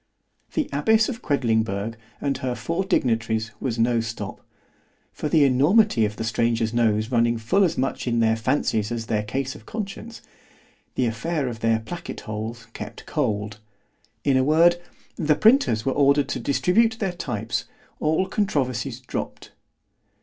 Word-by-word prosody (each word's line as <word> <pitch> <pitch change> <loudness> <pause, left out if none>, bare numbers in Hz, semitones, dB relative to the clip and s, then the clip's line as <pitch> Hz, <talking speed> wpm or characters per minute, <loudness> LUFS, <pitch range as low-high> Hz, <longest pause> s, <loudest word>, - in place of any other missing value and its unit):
The 310 -3 0
abbess 220 +10 +3
of 245 -2 -5
Quedlingberg 110 - 0 0.2
and 140 -1 -1
her 125 -1 -2
four 165 - -2
dignitaries 115 - 0
was 120 -3 -2
no 115 +1 +2
stop; 110 -3 -5 0.7
for 150 - -3
the 155 -2 +5
enormity 140 - +4
of 105 0 -3
the 115 - -4
stranger's 115 0 0
nose 110 -1 +1
running 115 -1 +2
full 175 - +2
as 170 -3 +1
much 130 0 -2
in 120 -1 +1
their 110 -1 +3
fancies 110 -2 0
as 115 -1 -3
their 110 -2 0
case 130 +5 -3
of 110 - -14
conscience——the 215 - -7
affair 140 +5 -1
of 115 -3 -5
their 115 0 +1
placket 170 +10 -7
holes 110 +1 -6
kept 105 - -8
cold—in 110 0 -3
a 130 - +3
word, 170 +4 +4 0.4
the 150 -2 +2
printers 215 - +4
were 135 - +1
ordered 140 0 +3
to - - -2
distribute 220 +10 +2
their 195 -5 -2
types——all 150 - -3
controversies 135 - -1
dropp'd. 125 - -6
125 Hz, 145 wpm, -24 LUFS, 110-155 Hz, 0.7 s, the